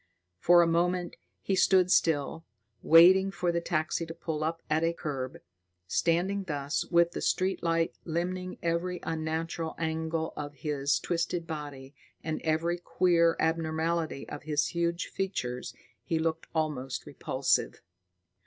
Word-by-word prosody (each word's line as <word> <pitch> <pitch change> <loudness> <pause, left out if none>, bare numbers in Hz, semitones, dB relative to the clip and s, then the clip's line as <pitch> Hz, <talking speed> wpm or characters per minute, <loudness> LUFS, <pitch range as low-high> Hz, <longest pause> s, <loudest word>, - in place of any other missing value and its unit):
For 175 - +6
a - - +2
moment, 175 +1 0 0.3
he 195 - 0
stood 185 -1 +4
still, 160 -2 +2 0.4
waiting 185 +4 +7
for 175 -2 -1
the 170 0 -1
taxi 165 0 -1
to 165 - -7
pull 155 -2 -3
up 165 +1 -2
at 155 +1 +1
the 165 0 +1
curb. 135 -6 -4 0.5
Standing 180 - +1
thus, 145 -4 -2
with 170 -1 +3
the - - -5
street 190 +1 0
light 165 -1 +1
limning 180 +2 -3
every 170 +2 -1
unnatural 160 0 -3
angle 160 0 -2
of 145 0 -6
his 140 0 0
twisted 170 0 -2
body 145 -4 -7 0.3
and 155 -1 -3
every 165 +2 0
queer 170 -2 +3
abnormality 160 -1 -1
of 145 - -7
his 150 -1 0
huge 170 0 -1
features, 125 -11 -3 0.3
he 165 - -1
looked 160 0 -1
almost 135 -5 -2
repulsive. - - -1
165 Hz, 135 wpm, -29 LUFS, 155-175 Hz, 0.5 s, waiting